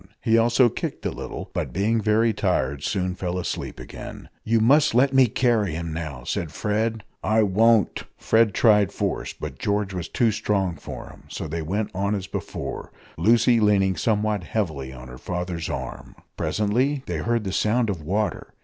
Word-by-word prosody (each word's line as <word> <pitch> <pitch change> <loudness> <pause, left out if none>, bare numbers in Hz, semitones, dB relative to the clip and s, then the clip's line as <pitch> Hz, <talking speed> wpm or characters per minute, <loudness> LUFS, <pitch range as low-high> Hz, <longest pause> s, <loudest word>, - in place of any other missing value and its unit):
He 115 - +2
also 120 +2 +5
kicked 115 - -4
a - - 0
little, - - -7
but, - - -2
being 110 +5 +1
very 110 +2 +3
tired, 70 -9 0
soon 90 +2 -1
fell 90 0 -3
asleep 90 - -4
again. - - -9
"You 115 +1 +2
must 145 +4 +4
let 135 +2 +4
me 130 -1 +6
carry 110 -6 +1
him 85 0 -4
now!" 80 -6 -5
said 80 +4 -3
Fred. 110 +4 -1 0.2
"I 110 0 +3
won't!" 110 +2 +3
Fred 110 -3 +3
tried 105 -4 +4
force, - - -2
but - - -7
George 100 -1 -1
was 90 -2 -4
too 115 -2 +2
strong 95 -4 0
for - - -8
him, - - -17
so - - -5
they 80 +2 -3
went 100 +7 -2
on 100 +2 0
as 95 -2 -4
before, - - -5 0.2
Lucy 115 +1 +4
leaning 100 -3 +3
somewhat 105 +1 0
heavily 80 -11 -3
on 65 -1 -10
her 65 0 -10
father's 90 -2 -4
arm. - - -6 0.2
Presently 125 +7 0
they 85 - -3
heard 115 +7 0
the 95 -2 -3
sound 115 +4 +2
of 95 -6 -3
water. 100 +4 -2
105 Hz, 175 wpm, -24 LUFS, 90-115 Hz, 0.2 s, me